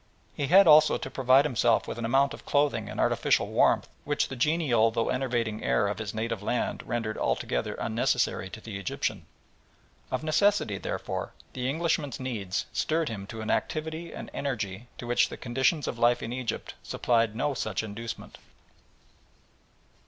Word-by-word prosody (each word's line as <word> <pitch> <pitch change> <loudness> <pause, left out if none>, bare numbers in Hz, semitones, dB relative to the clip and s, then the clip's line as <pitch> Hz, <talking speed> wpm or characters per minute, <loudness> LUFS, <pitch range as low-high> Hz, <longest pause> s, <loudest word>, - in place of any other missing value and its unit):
He 140 - -2
had 195 +5 +7
also 155 -1 +7
to 135 - -6
provide 135 +2 +4
himself 120 -4 +2
with - - -5
an 115 - -2
amount 135 +4 +3
of - - -10
clothing 140 -8 +1
and 105 - -6
artificial - - +2
warmth - - +3 0.2
which 145 0 0
the 135 - -5
genial 130 -5 +3
though 115 +1 -1
enervating 120 -4 -1
air 100 - +2
of 105 - -3
his 105 -2 -3
native 110 -1 -3
land 120 +4 -1
rendered 110 -2 -2
altogether 60 - -1
unnecessary 95 - 0
to 110 - -9
the 105 -3 -7
Egyptian. 100 - -3 0.8
Of - - -2
necessity, 155 - +2
therefore, - - -4 0.2
the 125 0 -2
Englishman's 145 -3 -1
needs 110 -8 -3
stirred 160 -1 0
him 100 -3 -6
to 110 0 -7
an 110 - -2
activity 160 +2 -2
and - - -8
energy 110 -5 -3
to - - -7
which 120 0 +2
the - - -7
conditions 130 +5 0
of 120 - -4
life 120 +1 +3
in 115 - -4
Egypt 125 -2 -4
supplied 115 -2 +1
no 145 +4 0 0.3
inducement. 110 +2 -7
120 Hz, 160 wpm, -28 LUFS, 110-145 Hz, 0.8 s, had